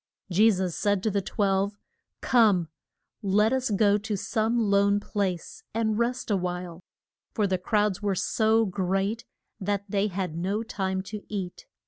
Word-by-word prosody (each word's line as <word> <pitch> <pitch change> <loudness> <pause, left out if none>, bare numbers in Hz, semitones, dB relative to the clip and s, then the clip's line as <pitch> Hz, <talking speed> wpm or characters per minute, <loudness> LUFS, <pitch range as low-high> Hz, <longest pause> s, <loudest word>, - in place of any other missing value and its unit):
Je 210 +6 +6
sus 185 -4 0
said 205 -2 +1
to 220 - +1
the 200 0 0
twelve, 200 0 0 0.4
Come, 205 -9 +4 0.5
let 210 +4 +3
us 260 -1 0
go 205 0 +3
to 215 0 -3
some 225 +3 0
lone 200 -2 +3
place 205 - -3
and 220 -1 +1
rest 240 -1 -1
a - - +4
while. 180 -1 -4 0.5
For 215 - +2
the 190 -2 0
crowds 210 0 +1
were 200 -2 0
so 220 +4 +2
great 195 +3 -1 0.3
that 200 0 -1
they 200 +1 +1
had 185 -4 -3
no 195 +6 -1
time 190 -4 -2
to 205 +2 -7
eat. 190 -4 -5
200 Hz, 155 wpm, -27 LUFS, 190-215 Hz, 0.5 s, Je